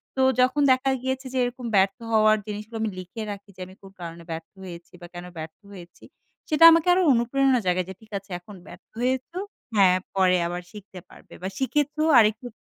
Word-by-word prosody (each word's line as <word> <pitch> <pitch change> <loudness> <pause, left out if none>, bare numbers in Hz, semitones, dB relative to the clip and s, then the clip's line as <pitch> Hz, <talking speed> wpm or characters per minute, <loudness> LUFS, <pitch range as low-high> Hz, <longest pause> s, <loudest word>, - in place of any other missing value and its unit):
তো 265 - 0 0.2
যখন 255 +3 +2
দেখা 260 +1 +2
গিয়েছে 260 +1 -3
যে 260 - -2
এরকম 245 0 -4
ব্যর্থ 195 0 +3
হওয়ার 215 -1 +4
জিনিসগুলো 210 +2 -6
আমি 220 - 0
লিখে 185 +5 -8
রাখি 200 0 -10
যে 185 - -11
আমি 185 - -15
কোন 195 - -14
কারণে 170 0 -8
ব্যর্থ 160 0 -6
হয়েছি 170 -2 -11
বা, 175 - -9
কেন 175 0 -8
ব্যর্থ 160 0 -8
হয়েছি? 180 -3 -13 0.5
সেটা 310 +1 +3
আমাকে 330 +1 +3
আরো 370 - +3
অনুপ্রেরণা 255 +2 +2
জাগায়। 180 0 +1
যে 190 - -6
"ঠিক 220 - -20
আছে, 195 +1 -12
এখন 200 +3 -13
ব্যর্থ - - -13 0.2
হয়েছো, 260 +7 -2 0.4
হ্যাঁ, 185 -3 +5 0.2
পরে 185 -1 +3
আবার 175 +1 -4
শিখতে 200 -3 -11
পারবে - - -17
বা, 185 - -3
শিখেছো, 295 +3 -1 0.2
আরেকটু 220 +2 +2
215 Hz, 195 wpm, -24 LUFS, 185-260 Hz, 0.5 s, হ্যাঁ